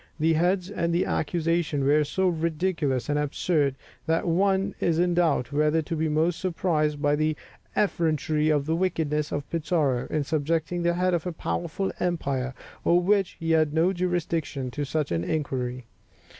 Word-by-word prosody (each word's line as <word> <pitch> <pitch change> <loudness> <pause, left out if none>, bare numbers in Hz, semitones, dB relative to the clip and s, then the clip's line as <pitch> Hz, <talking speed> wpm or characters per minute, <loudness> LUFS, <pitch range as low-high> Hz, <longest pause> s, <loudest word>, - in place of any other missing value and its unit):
The 160 +1 +3
heads 180 +3 +1
of 170 -4 -1
the 170 +2 +1
accusation 165 -2 0
were 150 +2 +4
so 190 +6 0
ridiculous 160 -5 0
and 145 0 +1
absurd, 150 -1 0 0.3
that 165 +2 +1
one 195 +3 +2
is 165 -2 +1
in 175 +1 +2
doubt 165 -7 +1
whether 150 +2 +2
to 165 - -3
be 160 0 0
most 160 +3 +1
surprised 160 -5 0
by 145 0 +2
the 155 0 0 0.4
effrontery 155 -5 +1
or 150 - +3
the 160 +3 -1
wickedness 160 -4 0
of 145 -1 -3
Pizarro, 150 -6 0
in 155 -1 -1
subjecting 160 +3 -1
the 170 0 +1
head 180 +1 +1
of 175 0 -1
a - - -1
powerful 170 +3 -3
empire, 140 -7 -1 0.3
over 175 +1 +4
which 195 -1 +2
he 165 0 -1
had 155 -1 +3
no 170 +4 +3
jurisdiction, 165 -7 -2
to 145 +3 -3
such 150 +1 -2
an 85 0 0
inquiry. 130 - -2
160 Hz, 170 wpm, -26 LUFS, 150-175 Hz, 0.4 s, were